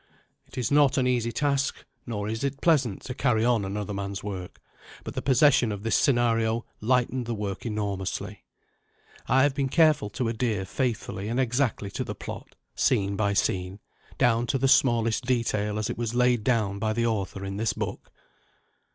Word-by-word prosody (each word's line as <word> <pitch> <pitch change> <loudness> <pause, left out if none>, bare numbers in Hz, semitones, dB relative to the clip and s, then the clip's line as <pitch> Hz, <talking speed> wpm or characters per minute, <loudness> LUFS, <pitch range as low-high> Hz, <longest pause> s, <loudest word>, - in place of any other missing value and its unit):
It - - -15
is 125 0 -1
not 145 -2 +4
an 130 - +2
easy 120 -2 +1
task, 140 +1 -1 0.2
nor 105 -3 -3
is 110 +3 -3
it 140 0 -2
pleasant, 135 - +2
to 125 - -5
carry 120 -4 +1
on 120 -4 +2
another 105 +1 -4
man's 100 0 -4
work: 95 -3 -6 0.4
but - - -6
the - - -3
possession 130 -3 +4
of 100 0 -5
this 115 - +1
scenario 115 -3 +2
lightened 125 +1 0
the 120 - -2
work 100 +1 -4
enormously. 100 -3 -4 0.8
I 130 +2 +4
have 145 -1 +3
been 135 -1 -1
careful 155 -8 +3
to 120 +4 -2
adhere 110 -4 -1
faithfully 110 -4 -3
and 120 +3 -1
exactly 125 -5 0
to - - -3
the - - -6
plot, - - -8 0.2
scene 100 0 +1
by 100 0 +1
scene, 95 -1 -1 0.4
down 120 0 +2
to 135 - +1
the 135 - +1
smallest 120 -3 +3
detail 110 -4 0
as 105 0 -1
it 120 - -5
was 120 0 -2
laid 125 -2 +3
down 105 -5 +1
by 110 0 0
the 115 +1 0
author 100 -3 -2
in 100 0 -4
this 110 0 0
book. - - -5
115 Hz, 180 wpm, -26 LUFS, 105-125 Hz, 0.8 s, not